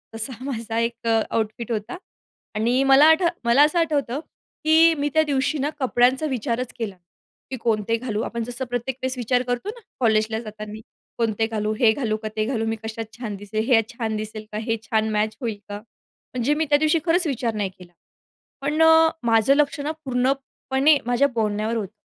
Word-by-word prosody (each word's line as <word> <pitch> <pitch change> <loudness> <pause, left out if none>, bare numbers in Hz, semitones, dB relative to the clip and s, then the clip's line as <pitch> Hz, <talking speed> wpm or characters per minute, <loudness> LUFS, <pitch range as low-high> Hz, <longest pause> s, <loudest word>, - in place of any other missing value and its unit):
तसा 225 +4 -4
माझा 230 -4 -4
एक 230 0 -2
अ, 225 -1 +4
आउटफिट 225 +1 -2
होता 220 - -3 0.6
आणि 240 +5 +2
मला 270 +2 +7
आठ 320 +3 +5 0.2
मला 235 +5 +6
असं 305 +3 +2
आठवतं 290 -5 0 0.4
की 320 +1 +6
मी 290 +1 0
त्या 315 0 +4
दिवशी 280 0 0
ना 285 +1 0
कपड्यांचा 260 +2 +2
विचारच 245 0 -2
केला 215 -4 -3
नाही. 180 - -34 0.5
की 260 - -3
"कोणते 225 -1 0
घालू?" 225 -3 -3
आपण 235 -1 -3
जसं 245 +3 -5
प्रत्येक 245 +1 -2
वेळेस 260 0 -2
विचार 245 +1 +1
करतो 245 +10 -3
ना 475 +3 -7 0.2
कॉलेजला 220 -1 +2
जाताना. 215 -1 -8 0.4
"कोणते 225 -1 0
घालू? 215 -1 -2
हे 230 -3 +6
घालू 220 -3 -1
का? - - -2
ते 215 - 0
घालू? 225 -2 -1
मी 225 0 -1
कशात 220 0 -5
छान 220 -5 -5
दिसेल? 205 +2 -3
हे 235 -4 +5
छान 225 -2 -3
दिसेल 215 0 -6
का? 210 - -4
हे 225 +1 -1
छान 220 0 0
मॅच 215 +1 0
होईल 225 -4 -3
का?" 205 - -4
म्हणजे 240 +4 -5
मी 315 +1 0
त्यादिवशी 305 +2 +3
खरंच 345 +1 +3
विचार 240 -5 -1
नाही 205 -2 -1
केला. 175 -1 -14 0.7
पण 295 +3 0
अ, 320 0 +7 0.2
माझं 225 +5 +4
लक्ष 295 0 +1
ना 290 - -2
पूर्णपणे 270 +2 +1
माझ्या 245 +3 +3
बोलण्यावर 215 0 -1
होतं. 205 -3 -3
235 Hz, 190 wpm, -23 LUFS, 220-275 Hz, 0.7 s, मला